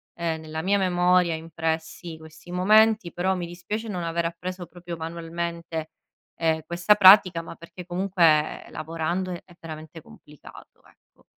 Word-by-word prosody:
ehm, 165 Hz, -2 st, -2 dB
nella 160 Hz, 0 st, -5 dB
mia 200 Hz, +3 st, +2 dB
memoria 180 Hz, -2 st, +3 dB
impressi 160 Hz, +1 st, -4 dB
questi 160 Hz, +2 st, -15 dB
momenti, 210 Hz, +1 st, +4 dB
però 190 Hz, +2 st, 0 dB
mi 175 Hz, -, -4 dB
dispiace 205 Hz, +6 st, -5 dB
non 180 Hz, -4 st, -3 dB
aver 170 Hz, 0 st, -1 dB
appreso 175 Hz, +2 st, -5 dB
proprio 175 Hz, -1 st, -8 dB
manualmente, 165 Hz, 0 st, -5 dB, 0.5 s
ehm, 160 Hz, -1 st, +1 dB
questa 175 Hz, +5 st, +3 dB
pratica 185 Hz, -3 st, +7 dB
ma 165 Hz, -, -10 dB
perché 170 Hz, +1 st, -11 dB
comunque 175 Hz, -4 st, +2 dB
lavorando 165 Hz, +4 st, -3 dB
è 175 Hz, 0 st, -11 dB
veramente 160 Hz, 0 st, -9 dB
complicato 150 Hz, -1 st, -16 dB
ecco. -, -, -27 dB
170 Hz, 135 wpm, -25 LUFS, 160-180 Hz, 0.5 s, pratica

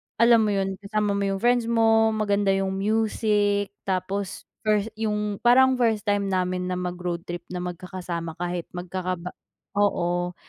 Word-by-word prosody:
alam 235 Hz, 0 st, +6 dB
mo 210 Hz, -, +1 dB
yun? 195 Hz, 0 st, -1 dB
Kasama 210 Hz, +1 st, -1 dB
mo 200 Hz, -, 0 dB
yung 195 Hz, 0 st, -1 dB
friends 240 Hz, -1 st, +3 dB
mo, 225 Hz, -1 st, +4 dB
maganda 205 Hz, -1 st, +1 dB
yung 195 Hz, 0 st, 0 dB
music, 205 Hz, -1 st, +1 dB
tapos 190 Hz, +1 st, -3 dB, 0.5 s
yung 210 Hz, -2 st, -1 dB
parang 260 Hz, +2 st, +6 dB
first 225 Hz, -4 st, +2 dB
time 205 Hz, -1 st, +2 dB
namin 180 Hz, -1 st, 0 dB
na 185 Hz, -, -2 dB
mag-road 180 Hz, -1 st, -3 dB
trip 175 Hz, 0 st, -6 dB
na 180 Hz, -, -3 dB
magkakasama 175 Hz, -2 st, -5 dB
kahit 175 Hz, -1 st, -3 dB
magkakaba 180 Hz, 0 st, -4 dB, 0.5 s
oo. 175 Hz, -3 st, +1 dB
200 Hz, 145 wpm, -25 LUFS, 180-215 Hz, 0.5 s, alam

